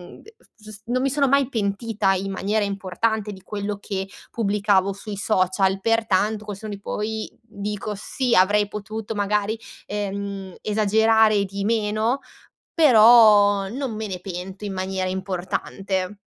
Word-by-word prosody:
ehm, - - -16
s 445 +2 -19
gius 215 -1 -12
non 250 +2 0
mi 275 - +2
sono 280 0 +2
mai 275 -1 +3
pentita 205 -2 0
in 195 +1 -3
maniera 205 +3 0
importante 205 +2 -2
di 190 - -12
quello 205 0 -4
che 195 -1 -4 0.2
pubblicavo 200 -3 +1
sui 200 0 -7
social, 190 -1 +1
pertanto, 220 -1 +1
col 205 -2 -5
senno 210 +1 -7
di 200 - -7
poi, 215 +1 -3
dico, 210 -1 -5
sì 245 +4 -2
avrei 205 +2 +4
potuto, 210 +1 -6
magari, 210 +2 0 0.3
ehm, 200 -2 -4
esagerare 210 -1 -1 0.5
di 200 +1 -5
meno, 220 +3 0 0.5
però 215 - +6
non 255 -1 -4
me 215 0 -4
ne 185 -2 -5
pento 185 +2 -7
in 195 - -4
maniera 185 0 -2
importante. 190 +1 -3
205 Hz, 145 wpm, -23 LUFS, 195-220 Hz, 0.5 s, però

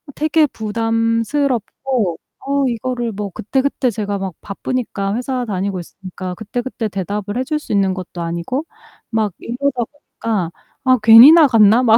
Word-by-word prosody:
되게 310 +1 +3
부담스럽고 230 - -1 0.3
어 280 0 +1
이거를 240 -1 -2
뭐 205 0 -4
그때그때 260 +6 -1
제가 205 -1 -3
막 190 -2 -4
바쁘니까 200 -1 -3
회사 250 +1 -2
다니고 195 -2 -2
있으니까 185 +1 -8
그때그때 225 +2 -4
대답을 205 +3 -4
해 255 - 0
줄 305 +2 -1
수 - - -10
있는 195 -2 +2
것도 180 -2 -7
아니고 170 - -3 0.4
막 220 -2 0
이러다 250 +1 -2
보니까 220 - -4 0.3
'아 255 -1 +4
괜히 230 +6 +10
나갔나?' 240 -9 +6
막 225 -2 +6
225 Hz, 315 characters per minute, -18 LUFS, 200-255 Hz, 0.4 s, 괜히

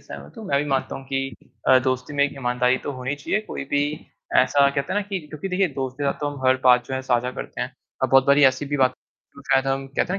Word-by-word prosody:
सहमत - - -10
हूँ, 220 - -8
मैं 140 - +2
भी 145 - 0
मानता 135 -1 -1
हूँ 135 - -10
कि 135 0 -1 0.5
अ, 130 -1 +7
दोस्ती 130 +2 -2
में 140 - +3
एक 145 - -2
ईमानदारी 125 0 +1
तो 145 - -3
होनी 130 +2 -3
चाहिए, 145 +9 -1
कोई - - -5
भी 145 0 +2 0.5
ऐसा 140 +2 +5
कहते 140 +6 -2
हैं 205 - +1
ना - - -3
कि 195 -2 -2
क्योंकि 155 +6 -6
देखिए 185 0 +1
दोस्त 130 -2 -4
के 145 - -2
साथ 140 - +2
तो 145 - -1
हम 140 -2 -9
हर 130 0 +5
बात 125 -1 +6
जो 130 - -4
है 130 - -2
साझा 125 -1 0
करते - - -7
हैं। - - -3 0.3
अ, - - +4
बहुत 135 -1 +5
बारी 140 0 +6
ऐसी 130 +1 +3
भी 145 +1 -1
बात 130 -1 +3 0.4
जो 140 - -12
शायद 135 0 +3
हम 135 0 -1
कहते 135 - -3
हैं 195 - -1
135 Hz, 275 wpm, -23 LUFS, 130-145 Hz, 0.5 s, अ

